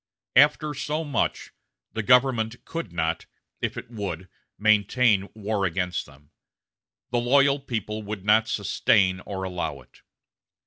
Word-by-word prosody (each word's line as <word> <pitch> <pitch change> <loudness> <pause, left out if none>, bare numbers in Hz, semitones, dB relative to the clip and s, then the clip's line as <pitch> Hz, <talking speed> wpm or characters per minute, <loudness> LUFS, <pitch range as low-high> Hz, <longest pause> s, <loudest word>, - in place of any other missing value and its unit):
After 150 +2 +4
so 150 +3 -3
much, 145 -6 -2 0.4
the 110 - -2
government 125 -1 +2
could 165 - -5
not, 80 -1 -2 0.3
if - - -2
it - - -8
would, 95 -5 -5 0.3
maintain 105 0 +3
war 105 -1 -2
against 90 0 -1
them. 70 +1 -20 0.8
The 120 - +2
loyal 140 +3 +4
people 110 -5 -4
would 105 -2 -6
not 110 +1 +4
sustain 95 -2 +2
or 95 -2 -4
allow 90 -1 -3
it. - - -22
110 Hz, 130 wpm, -25 LUFS, 95-125 Hz, 0.8 s, After